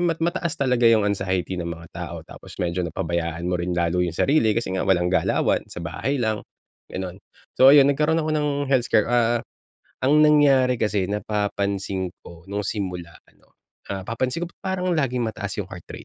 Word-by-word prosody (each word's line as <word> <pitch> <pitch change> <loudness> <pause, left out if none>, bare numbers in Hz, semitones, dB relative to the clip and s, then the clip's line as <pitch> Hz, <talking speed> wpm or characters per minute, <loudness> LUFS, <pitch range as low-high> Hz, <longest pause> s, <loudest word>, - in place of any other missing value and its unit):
mat 165 -1 -1
mataas 170 -1 -1
talaga 125 -4 +2
yung 115 -2 +5
anxiety 95 -2 -1
ng 85 - -3
mga 85 0 -8
tao 85 -1 -6
tapos - - -12
medyo 90 +1 -1
napabayaan 85 0 -3
mo 90 0 0
rin 90 0 -2
lalo 85 +1 +1
yung 90 -2 -1
sarili 115 - +3
kasi 115 -4 -2
nga 95 - -1
walang 90 -2 +2
galawan, 90 -3 +1
sa 85 - -8
bahay 85 +12 -2
lang, 110 -1 -1 0.4
gano'n. 95 0 -6 0.4
So 135 +2 +8
ayun 140 -1 +7
nagkaroon 155 +3 +1
ako 155 - -2
ng 150 -1 +1 0.2
health 130 -3 +3
scare. 110 +2 +2
Ah, 120 -1 +2 0.6
ang 150 +3 +5
nangyari 140 -4 +5
kasi 105 -4 0
napapansin 100 -2 -2
ko 85 0 -14
nung 100 +1 -3
simula 90 -5 -4
ano, - - -30 0.3
ah, 95 -1 -4
napapansin 125 - -2
ko, 170 - -10
"Ba't - - -62 0.2
parang 185 0 -2
laging 125 -7 0
mataas 105 -2 -4
yung 100 - -2
heart 90 -2 -10
rate - - -8
105 Hz, 185 wpm, -23 LUFS, 90-130 Hz, 0.6 s, So